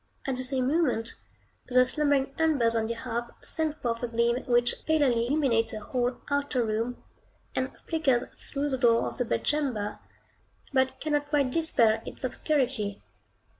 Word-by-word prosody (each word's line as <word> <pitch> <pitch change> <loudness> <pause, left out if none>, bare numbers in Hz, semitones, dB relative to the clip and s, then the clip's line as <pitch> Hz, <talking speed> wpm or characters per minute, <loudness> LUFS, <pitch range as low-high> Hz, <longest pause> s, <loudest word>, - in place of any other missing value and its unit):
At 270 -3 -1
the 255 - -3
same 255 -1 0
moment, 265 -7 +1 0.5
the 255 0 +5
slumbering 275 0 +1
embers 285 -8 +3
on 220 -1 +1
the 230 - -2
hearth 235 0 -4
send 315 -2 -2
forth 230 -1 -2
a 245 - -1
gleam 235 +1 +1
which 240 -1 +2
palely 265 -7 +3
illuminates 260 -5 +1
the 215 - -4
whole 245 +3 -1
outer 285 -4 +1
room, 225 +3 -2 0.5
and 260 +1 -2
flickers 275 -7 +1
through 285 +1 -4
the 265 -2 -2
door 230 -2 +4
of - - -7
the 245 - +1
bedchamber, 250 -6 -1 0.7
but 260 0 +1
cannot 295 -1 -1
quite 285 -3 +2
dispel 235 -9 +4
its - - -9
obscurity. 255 -6 -1
255 Hz, 155 wpm, -28 LUFS, 235-285 Hz, 0.7 s, the